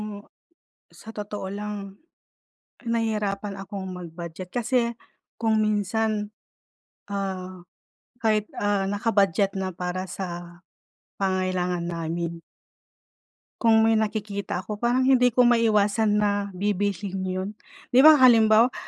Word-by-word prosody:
Mo 205 Hz, -1 st, -8 dB, 0.7 s
sa 225 Hz, -, -13 dB
totoo 205 Hz, -1 st, -5 dB
lang, 200 Hz, 0 st, -6 dB, 0.9 s
nahihirapan 210 Hz, -4 st, -1 dB
akong 195 Hz, 0 st, -6 dB
mag-budget 175 Hz, +1 st, -8 dB
kasi 240 Hz, 0 st, +1 dB, 0.5 s
kung 220 Hz, -1 st, +2 dB
minsan, 215 Hz, 0 st, 0 dB, 0.8 s
ah, 185 Hz, -2 st, -5 dB, 0.6 s
kahit, 215 Hz, -1 st, +2 dB
ah, 205 Hz, -1 st, 0 dB
naka-budget 200 Hz, -2 st, +1 dB
na 190 Hz, 0 st, -2 dB
para 180 Hz, +1 st, -4 dB
sa 175 Hz, -2 st, -7 dB, 0.6 s
pangangailangan 185 Hz, -2 st, -1 dB
namin 170 Hz, 0 st, -4 dB, 1.2 s
kung 225 Hz, -1 st, +5 dB
may 225 Hz, -, +4 dB
nakikita 205 Hz, -4 st, -2 dB
ako 210 Hz, -1 st, -6 dB
parang 245 Hz, +2 st, +2 dB
hindi 255 Hz, -2 st, +5 dB
ko 250 Hz, +1 st, +3 dB
maiwasan 220 Hz, -2 st, +3 dB
na 205 Hz, -1 st, 0 dB
bibilhin 200 Hz, -1 st, -1 dB
yun. 185 Hz, +1 st, -3 dB, 0.4 s
Di 255 Hz, -, +7 dB
ba 310 Hz, +1 st, +9 dB
halimbawa, 230 Hz, -2 st, +6 dB
205 Hz, 105 wpm, -25 LUFS, 185-220 Hz, 1.2 s, ba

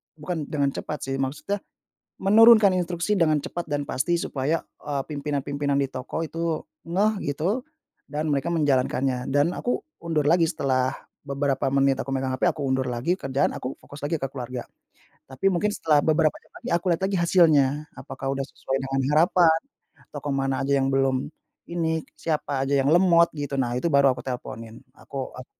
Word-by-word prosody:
bukan 155 Hz, 0 st, -4 dB
dengan 140 Hz, -2 st, 0 dB
cepat 150 Hz, +1 st, -5 dB
sih, 135 Hz, 0 st, -3 dB
maksudnya 150 Hz, +10 st, -2 dB, 0.6 s
menurunkan 220 Hz, +1 st, +7 dB
instruksi 175 Hz, +3 st, -1 dB
dengan 155 Hz, -3 st, +3 dB
cepat 175 Hz, -, -5 dB
dan 145 Hz, 0 st, 0 dB
pasti, 170 Hz, +7 st, 0 dB
supaya, 145 Hz, +4 st, -1 dB, 0.2 s
eee, 140 Hz, -2 st, -1 dB
pimpinan-pimpinan 140 Hz, -1 st, -2 dB
di -, -, +2 dB
toko 130 Hz, +6 st, -5 dB
itu 165 Hz, 0 st, -2 dB, 0.3 s
ngeh, 200 Hz, +5 st, +3 dB, 0.2 s
gitu, 185 Hz, -, -1 dB, 0.5 s
dan 155 Hz, +1 st, -2 dB
mereka 140 Hz, +4 st, -1 dB
menjalankannya. 130 Hz, -4 st, +1 dB
Dan 145 Hz, +5 st, +2 dB
aku 245 Hz, -, -1 dB, 0.2 s
undur 155 Hz, -3 st, 0 dB
lagi 170 Hz, -1 st, +4 dB
setelah 130 Hz, -1 st, +1 dB, 0.4 s
beberapa 140 Hz, -1 st, -1 dB
menit 135 Hz, -1 st, +3 dB
aku 135 Hz, -, -7 dB
megang 130 Hz, -1 st, -1 dB
HP, -, -, +1 dB
aku 150 Hz, -, -7 dB
undur 130 Hz, 0 st, 0 dB
lagi 125 Hz, +9 st, 0 dB
kerjaan. 135 Hz, -2 st, 0 dB
Aku 130 Hz, +1 st, -4 dB
fokus 145 Hz, -, -12 dB
lagi 165 Hz, -, 0 dB
ke -, -, 0 dB
keluarga. 125 Hz, -2 st, -6 dB, 0.7 s
Tapi 135 Hz, +9 st, 0 dB
mungkin 200 Hz, +4 st, +1 dB
setelah 155 Hz, -7 st, +3 dB
beberapa 155 Hz, -1 st, +3 dB
jam -, -, -29 dB
lagi, -, -, -7 dB
aku 170 Hz, -, -5 dB
lihat 170 Hz, -, -2 dB
lagi 195 Hz, -, -1 dB
hasilnya. 155 Hz, -5 st, +4 dB, 0.2 s
Apakah 135 Hz, 0 st, -4 dB
udah 135 Hz, -, -2 dB
sesuai 135 Hz, -, -3 dB
dengan 135 Hz, 0 st, -1 dB
harapan, 165 Hz, 0 st, +4 dB, 0.5 s
atau 145 Hz, -, -7 dB
ke 145 Hz, -, -2 dB
mana 135 Hz, -1 st, 0 dB
aja 140 Hz, -, +1 dB
yang 135 Hz, -, +1 dB
belum 135 Hz, -1 st, +1 dB, 0.4 s
ini, 160 Hz, -2 st, -1 dB, 0.2 s
siapa 145 Hz, -4 st, -1 dB
aja 140 Hz, -, +2 dB
yang 135 Hz, +1 st, +2 dB
lemot, 170 Hz, -1 st, +5 dB
gitu, 145 Hz, -2 st, -3 dB
nah 120 Hz, -2 st, 0 dB
itu 170 Hz, -, 0 dB
baru 140 Hz, -1 st, +5 dB
aku -, -, -9 dB
teleponin. 115 Hz, -3 st, -6 dB, 0.2 s
Aku 135 Hz, -2 st, -6 dB
ap 125 Hz, 0 st, -9 dB
145 Hz, 175 wpm, -25 LUFS, 135-165 Hz, 0.7 s, menurunkan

